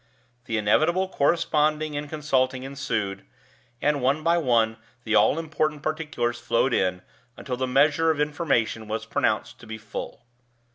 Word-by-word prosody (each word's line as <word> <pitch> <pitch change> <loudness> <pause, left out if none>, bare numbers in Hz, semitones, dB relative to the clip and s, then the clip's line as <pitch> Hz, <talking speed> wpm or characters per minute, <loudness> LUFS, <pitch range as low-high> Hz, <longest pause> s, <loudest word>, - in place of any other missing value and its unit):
The 115 - -2
inevitable 155 - +2
corresponding 155 -1 +1
and 145 0 -4
consulting 130 -4 0
ensued, 115 -8 -3 0.6
and 145 -2 +2
one 140 +5 +1
by 170 +1 +3
one 115 -6 +2 0.3
the 110 - -2
all 110 +7 +4
important 155 -2 -2
particulars 150 -7 -2
flowed 120 +2 +1
in, 90 -3 0 0.3
until 125 - -4
the 130 +1 -2
measure 150 +5 +3
of 155 -2 +1
information 145 -7 0
was 110 +1 -3
pronounced - - -1
to - - -14
be 110 0 -6
full. 110 - -8
140 Hz, 145 wpm, -25 LUFS, 115-155 Hz, 0.6 s, all